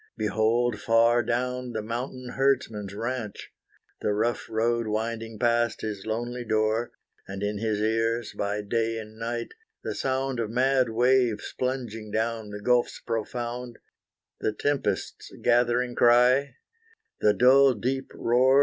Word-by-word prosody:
Behold 115 +1 +1
far 115 +2 +4
down 125 +1 -2
the 110 - -2
mountain 125 +3 -5
herdsman's 125 -7 0
ranche, 115 -1 -4 0.5
The 105 - +1
rough 115 +3 -1
road 115 +1 0
winding 115 +1 -3
past 120 0 +1
his 105 -1 -5
lonely 120 +2 -3
door, 110 +1 0 0.4
And 95 +1 -6
in 105 0 -2
his 110 -1 -1
ears, 115 +1 0
by 105 +1 -2
day 115 +2 -1
and 110 0 -9
night, 115 +1 -3 0.3
the - - -3
sound 130 -1 -1
Of 110 -2 -1
mad 130 +1 +2
waves 120 -1 +2
plunging 120 -4 -3
down 110 0 -2
the 105 0 -8
gulfs 125 +1 +2
profound, 120 +1 -4 0.6
The 110 - -1
tempest's 145 +5 -2
gathering 120 +1 +2
cry, 125 +3 +4 0.6
the 105 -1 +3
dull 135 +1 +6
deep 130 +5 -2
roar. 130 +3 +4
115 Hz, 130 wpm, -26 LUFS, 110-125 Hz, 0.6 s, dull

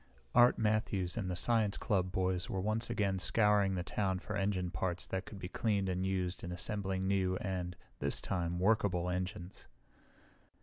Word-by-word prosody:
Art 120 +1 +6
Matthews 105 -4 0
and 100 -6 -2
the 90 - -1
science 110 +1 +2
club 90 -3 0
boys 90 -1 0
were 95 - -2
once 110 +4 0
again 100 -5 0
scouring 100 0 +3
the 90 - -2
town 95 0 -1
for 105 +2 -5
engine 95 -3 0
parts 90 -1 -2
that 95 +1 -3
could 105 - -8
be 90 - -5
cleaned 100 -1 0
and 90 0 -1
used 95 -1 -1
in 90 - -4
assembling 95 0 -2
new 95 -1 +1
and, 90 -2 -3 0.2
this - - 0
time, 85 -2 -2
workable 90 -3 +2
engines. 90 0 -5
95 Hz, 170 wpm, -34 LUFS, 90-105 Hz, 0.2 s, Art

